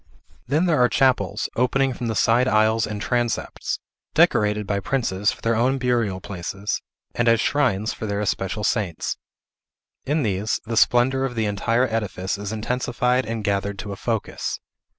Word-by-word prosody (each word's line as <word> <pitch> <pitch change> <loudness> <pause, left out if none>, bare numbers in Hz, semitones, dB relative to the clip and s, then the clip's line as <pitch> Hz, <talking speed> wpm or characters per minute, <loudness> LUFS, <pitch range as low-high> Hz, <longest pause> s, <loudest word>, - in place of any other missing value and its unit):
Then 150 +7 +2
there 155 -7 +3
are 125 - +5
chapels, 115 -6 +2
opening 130 +2 +2
from 120 0 -4
the 110 - -1
side 120 +4 +3
aisles 110 -1 +3
and 105 -1 -4
transepts, 120 +1 -1 0.4
decorated 105 0 +3
by 100 0 -1
princes 105 -3 0
for - - -11
their 115 0 +1
own 125 +4 +2
burial 120 -7 0
places, 100 +2 -4 0.3
and 120 - 0
as 115 -1 +5
shrines 115 -7 +1
for 110 - -5
their 100 0 -1
especial 100 0 -2
saints. 100 -7 -1 0.9
In 150 +2 +1
these, 105 0 0
the 115 0 -3
splendor 125 +4 +3
of 130 -2 -2
the 110 -1 0
entire 115 +5 +1
edifice 105 -4 -2
is 100 0 -4
intensified 125 +2 0
and 115 -1 -3
gathered 100 0 -1
to 100 +1 -6
a - - -4
focus. 110 +2 -3
115 Hz, 165 wpm, -23 LUFS, 100-125 Hz, 0.9 s, are